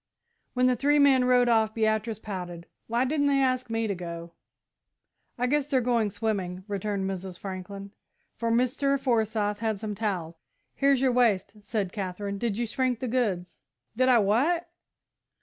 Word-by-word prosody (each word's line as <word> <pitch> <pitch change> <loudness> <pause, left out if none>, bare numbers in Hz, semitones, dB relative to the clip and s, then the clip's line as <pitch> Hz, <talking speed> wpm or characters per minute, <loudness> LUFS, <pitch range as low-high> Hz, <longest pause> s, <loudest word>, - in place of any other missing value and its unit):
When 250 0 +3
the 255 0 +4
three 290 +5 +2
men 275 -3 +5
rode 250 -1 +4
off, 220 -2 +2
Beatrice 220 0 0
pouted. 180 -5 -6 0.2
"Why 235 +3 +1
didn't 285 +1 +1
they 280 -1 +3
ask 255 -2 +1
me 225 0 0
to 205 - -1
go?" 170 -2 -7 1.1
"I 250 - +1
guess 290 +2 +1
they're 275 -3 +2
going 235 -3 +1
swimming," 190 -4 -3
returned 200 -1 -2
Mrs. 190 -1 -5
Franklin, 195 +1 -7 0.4
"for 230 - -2
Mr. 255 +4 +1
Forsyth 220 -5 0
had 220 -2 -1
some 215 0 -4
towels." 180 -6 -3 0.3
"Here's 275 -2 +3
your 265 -1 +3
waist," 235 -6 +2
said 200 -4 -2
Katherine; 200 0 -4
"did 225 -3 -1
you 240 - 0
shrink 250 +1 -1
the 255 - -3
goods?" 205 -8 -1 0.4
"Did 255 +2 +3
I 250 - +6
what?" 280 - +2
225 Hz, 165 wpm, -27 LUFS, 200-255 Hz, 1.1 s, I